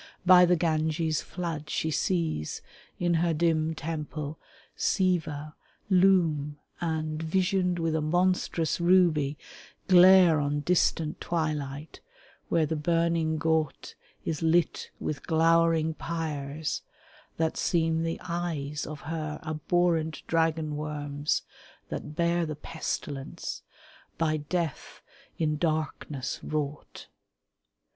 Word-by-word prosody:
By 180 Hz, -1 st, +8 dB
the 180 Hz, 0 st, +4 dB
Ganges' 160 Hz, -1 st, 0 dB
flood 165 Hz, -4 st, -5 dB
She 160 Hz, -, -1 dB
sees, 160 Hz, -, -1 dB, 0.3 s
in 175 Hz, -1 st, +1 dB
her 170 Hz, -2 st, +1 dB
dim 160 Hz, 0 st, +1 dB
temple, 155 Hz, -1 st, -5 dB, 0.4 s
Siva 160 Hz, -6 st, 0 dB, 0.4 s
loom 170 Hz, -6 st, +3 dB, 0.2 s
And, 155 Hz, -2 st, -2 dB
visioned 180 Hz, +2 st, +1 dB
with 165 Hz, -1 st, 0 dB
a 160 Hz, -, +1 dB
monstrous 175 Hz, -1 st, +1 dB
ruby, 170 Hz, -5 st, +3 dB, 0.5 s
glare 180 Hz, -3 st, +7 dB
On 145 Hz, 0 st, 0 dB
distant 160 Hz, -2 st, +1 dB
twilight 150 Hz, -3 st, -3 dB, 0.5 s
where 165 Hz, -2 st, +3 dB
the 160 Hz, -, -2 dB
burning 165 Hz, 0 st, +1 dB
ghaut 160 Hz, -2 st, -1 dB, 0.3 s
Is 155 Hz, -2 st, -2 dB
lit 165 Hz, +1 st, +1 dB
with 150 Hz, -3 st, -4 dB
glowering 165 Hz, -1 st, +3 dB
pyres 155 Hz, -3 st, -3 dB, 0.6 s
that 160 Hz, 0 st, 0 dB
seem 165 Hz, -1 st, +1 dB
the 165 Hz, 0 st, -2 dB
eyes 165 Hz, -5 st, -3 dB
Of 155 Hz, 0 st, -7 dB
her 155 Hz, -1 st, -4 dB
abhorrent 160 Hz, +1 st, 0 dB
dragon 160 Hz, -2 st, 0 dB
worms 145 Hz, -1 st, -2 dB, 0.5 s
that 150 Hz, -, -6 dB
bear 170 Hz, 0 st, +1 dB
The 155 Hz, -, -4 dB
pestilence, 145 Hz, -2 st, -5 dB, 0.6 s
by 155 Hz, -1 st, +1 dB
Death 160 Hz, 0 st, -4 dB, 0.3 s
in 155 Hz, -2 st, 0 dB
darkness 155 Hz, -4 st, -2 dB
wrought. 150 Hz, -1 st, -4 dB
160 Hz, 105 wpm, -28 LUFS, 150-170 Hz, 0.6 s, By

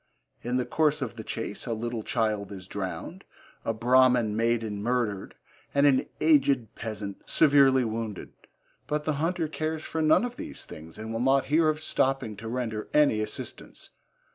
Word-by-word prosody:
In 125 Hz, +1 st, -1 dB
the 125 Hz, -, 0 dB
course 150 Hz, -2 st, +1 dB
of 120 Hz, -3 st, -5 dB
the 110 Hz, -, -7 dB
chase 115 Hz, 0 st, -5 dB
a 115 Hz, -, 0 dB
little 115 Hz, +1 st, -3 dB
child 105 Hz, -2 st, -1 dB
is 95 Hz, -2 st, -8 dB
drowned, 95 Hz, -2 st, -5 dB, 0.4 s
a -, -, 0 dB
Brahmin 120 Hz, -1 st, +3 dB
maiden 115 Hz, -2 st, 0 dB
murdered, 115 Hz, -4 st, -1 dB, 0.4 s
and 140 Hz, 0 st, +5 dB
an 135 Hz, -2 st, +4 dB
aged 140 Hz, -7 st, +3 dB
peasant 105 Hz, -3 st, -6 dB
severely 140 Hz, -4 st, +5 dB
wounded, 110 Hz, -2 st, -4 dB, 0.6 s
but 150 Hz, 0 st, -1 dB
the 155 Hz, -, 0 dB
hunter 165 Hz, 0 st, 0 dB
cares 155 Hz, 0 st, -3 dB
for 160 Hz, -, -3 dB
none 155 Hz, +9 st, +4 dB
of 245 Hz, 0 st, -6 dB
these 310 Hz, -1 st, -7 dB
things 80 Hz, +1 st, -10 dB
and 110 Hz, +1 st, -6 dB
will 115 Hz, -, -2 dB
not 135 Hz, +2 st, +3 dB
hear 160 Hz, 0 st, +5 dB
of 155 Hz, 0 st, -1 dB
stopping 135 Hz, -7 st, 0 dB
to 110 Hz, +2 st, -7 dB
render 115 Hz, -3 st, -3 dB
any 145 Hz, -8 st, +4 dB
assistance. 110 Hz, -, -7 dB
120 Hz, 165 wpm, -27 LUFS, 110-145 Hz, 0.6 s, and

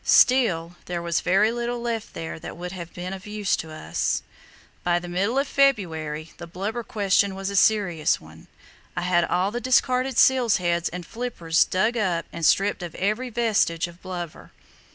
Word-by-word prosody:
Still, 175 Hz, -10 st, +4 dB
there 175 Hz, -1 st, -3 dB
was 170 Hz, 0 st, -1 dB
very 195 Hz, +5 st, +3 dB
little 240 Hz, 0 st, -2 dB
left 230 Hz, -2 st, -4 dB
there 160 Hz, 0 st, -5 dB
that -, -, -8 dB
would 180 Hz, +1 st, -6 dB
have 170 Hz, -3 st, -7 dB
been 180 Hz, +1 st, -6 dB
of 190 Hz, +1 st, -9 dB
use 210 Hz, -2 st, 0 dB
to 160 Hz, -, -6 dB
us. 80 Hz, -, -2 dB, 0.6 s
By 175 Hz, 0 st, +2 dB
the 175 Hz, 0 st, -5 dB
middle 195 Hz, +8 st, 0 dB
of 275 Hz, +1 st, +2 dB
February 160 Hz, -, +1 dB
the 170 Hz, -, -8 dB
blubber 200 Hz, +7 st, -4 dB
question 200 Hz, -3 st, +1 dB
was 195 Hz, +1 st, -3 dB
a -, -, -4 dB
serious 190 Hz, -7 st, +3 dB
one. 80 Hz, +1 st, -15 dB, 0.5 s
I -, -, 0 dB
had 175 Hz, -1 st, +2 dB
all 185 Hz, +4 st, +1 dB
the 240 Hz, +2 st, -3 dB
discarded 255 Hz, 0 st, +2 dB
seals' 255 Hz, -4 st, +5 dB
heads 170 Hz, -1 st, 0 dB
and 175 Hz, 0 st, -7 dB
flippers 200 Hz, -9 st, 0 dB
dug 215 Hz, +6 st, +1 dB
up 180 Hz, -6 st, 0 dB
and 170 Hz, -, -6 dB
stripped 195 Hz, +5 st, +3 dB
of 175 Hz, -2 st, -6 dB
every 215 Hz, +6 st, -1 dB
vestige 215 Hz, -8 st, +1 dB
of 175 Hz, +1 st, -15 dB
blubber. 175 Hz, -3 st, -7 dB
185 Hz, 180 wpm, -24 LUFS, 170-225 Hz, 0.6 s, seals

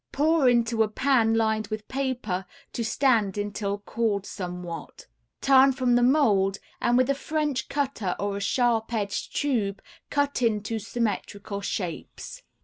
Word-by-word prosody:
Pour 300 Hz, -2 st, +3 dB
into 235 Hz, -1 st, +2 dB
a 220 Hz, -, +4 dB
pan 225 Hz, 0 st, +2 dB
lined 220 Hz, -1 st, +1 dB
with 215 Hz, 0 st, -5 dB
paper 250 Hz, -9 st, -2 dB, 0.3 s
to 235 Hz, -, -2 dB
stand 220 Hz, -4 st, +2 dB
until 205 Hz, 0 st, -2 dB
cooled 205 Hz, -1 st, -1 dB
somewhat; 180 Hz, -5 st, -7 dB, 0.4 s
turn 270 Hz, 0 st, +6 dB
from 255 Hz, -1 st, +1 dB
the 245 Hz, -, +4 dB
mold 215 Hz, -8 st, +3 dB, 0.2 s
and 240 Hz, 0 st, +3 dB
with 255 Hz, 0 st, +3 dB
a 275 Hz, -, +3 dB
French 295 Hz, -1 st, -2 dB
cutter 265 Hz, -10 st, -1 dB
or 200 Hz, 0 st, -1 dB
a -, -, -5 dB
sharp 230 Hz, +1 st, +1 dB
edged 200 Hz, -2 st, -3 dB
tube 215 Hz, -9 st, 0 dB, 0.3 s
cut 285 Hz, -2 st, 0 dB
into 220 Hz, -1 st, 0 dB
symmetrical 205 Hz, -2 st, -3 dB
shapes. 195 Hz, -, -5 dB
225 Hz, 140 wpm, -26 LUFS, 200-260 Hz, 0.4 s, turn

